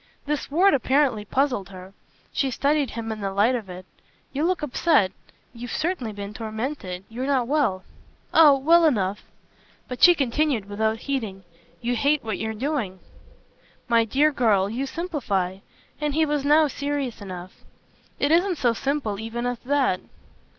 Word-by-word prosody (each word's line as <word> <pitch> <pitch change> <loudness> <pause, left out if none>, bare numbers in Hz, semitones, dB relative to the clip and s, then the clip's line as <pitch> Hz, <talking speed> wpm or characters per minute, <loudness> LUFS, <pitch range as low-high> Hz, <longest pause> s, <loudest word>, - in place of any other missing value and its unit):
This 295 0 -2
word 365 +7 +4
apparently 260 -4 +2
puzzled 250 -5 0
her 185 0 -11 0.4
she 270 - +1
studied 280 +1 +1
him 225 0 -5
in 215 -1 -5
the 195 -1 -2
light 205 +6 +3
of 225 -6 -4
it. 180 0 -9 0.5
"You 285 +3 -1
look 365 -2 0
upset 250 - +2 0.4
you've 245 +1 -8
certainly 310 -8 -2
been 205 0 -7
tormented. 220 -4 -5
You're 250 +4 -5
not 260 -4 +1
well." 255 -10 +1 0.5
"Oh 300 -4 +7
well 330 +5 +5
enough!" 205 -8 +1 0.7
But 250 - -7
she 350 -1 +8
continued 275 -4 0
without 220 +2 -1
heeding. 220 -9 -3 0.4
"You 245 +1 -1
hate 280 +4 +2
what 220 - -3
you're 220 0 -3
doing." 245 -6 -2 0.9
"My 230 -1 +4
dear 280 +7 +2
girl, 210 -7 +2
you 265 +4 -2
simplify" 230 - -2 0.4
and 295 -1 -1
he 320 0 +3
was 295 -2 -1
now 300 +2 +5
serious 280 -5 -3
enough. 185 -2 -9 0.6
"It 285 - +1
isn't 350 +2 +3
so 240 -4 +2
simple 250 -5 -2
even 225 +2 -4
as 245 -1 -2
that." 265 -8 +1
250 Hz, 155 wpm, -24 LUFS, 210-290 Hz, 0.9 s, she